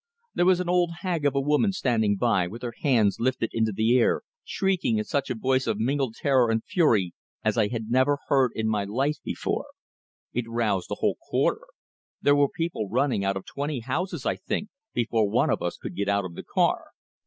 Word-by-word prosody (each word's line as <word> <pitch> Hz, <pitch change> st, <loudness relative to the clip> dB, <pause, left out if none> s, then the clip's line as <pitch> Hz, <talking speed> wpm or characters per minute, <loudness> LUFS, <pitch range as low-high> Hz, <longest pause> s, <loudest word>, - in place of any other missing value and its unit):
There 175 Hz, -, +2 dB
was 185 Hz, -1 st, +5 dB
an 180 Hz, -, -2 dB
old 175 Hz, -1 st, +3 dB
hag 170 Hz, -6 st, 0 dB
of 140 Hz, -, -1 dB
a -, -, +3 dB
woman 150 Hz, +9 st, +2 dB
standing 115 Hz, -, +1 dB
by, 100 Hz, -6 st, +2 dB
with 115 Hz, +7 st, -9 dB
her 120 Hz, -1 st, -4 dB
hands 115 Hz, -9 st, +3 dB
lifted 120 Hz, -2 st, 0 dB
into 110 Hz, -1 st, +1 dB
the 110 Hz, +4 st, +2 dB
air, 115 Hz, -, +2 dB, 0.2 s
shrieking 190 Hz, -, 0 dB
in 105 Hz, -, 0 dB
such 140 Hz, +5 st, -2 dB
a 125 Hz, -, -1 dB
voice 130 Hz, +3 st, +1 dB
of -, -, 0 dB
mingled 130 Hz, -1 st, 0 dB
terror 130 Hz, -4 st, +3 dB
and 115 Hz, 0 st, 0 dB
fury 110 Hz, -, +2 dB, 0.3 s
as 110 Hz, -, +2 dB
I 110 Hz, -3 st, +3 dB
had 115 Hz, 0 st, -5 dB
never 130 Hz, +3 st, +3 dB
heard 135 Hz, -4 st, +3 dB
in 110 Hz, 0 st, -1 dB
my 105 Hz, -2 st, +1 dB
life 135 Hz, +9 st, -1 dB
before. -, -, -3 dB, 0.7 s
It 120 Hz, -2 st, -2 dB
roused 110 Hz, -6 st, 0 dB
the -, -, -3 dB
whole -, -, +1 dB
quarter; -, -, 0 dB, 0.5 s
there 145 Hz, -, +4 dB
were 145 Hz, -1 st, +3 dB
people 165 Hz, -, -3 dB
running 125 Hz, -2 st, +1 dB
out 100 Hz, 0 st, 0 dB
of 95 Hz, -, -8 dB
twenty 140 Hz, -2 st, -3 dB
houses, 160 Hz, +5 st, -3 dB
I -, -, 0 dB
think, 210 Hz, -, -3 dB, 0.3 s
before 115 Hz, -3 st, +1 dB
one -, -, +2 dB
of -, -, 0 dB
us -, -, -2 dB
could -, -, -7 dB
get 100 Hz, 0 st, -1 dB
out 100 Hz, -1 st, +1 dB
of 90 Hz, -, -7 dB
the -, -, -7 dB
car. -, -, +1 dB
120 Hz, 210 wpm, -26 LUFS, 110-145 Hz, 0.7 s, was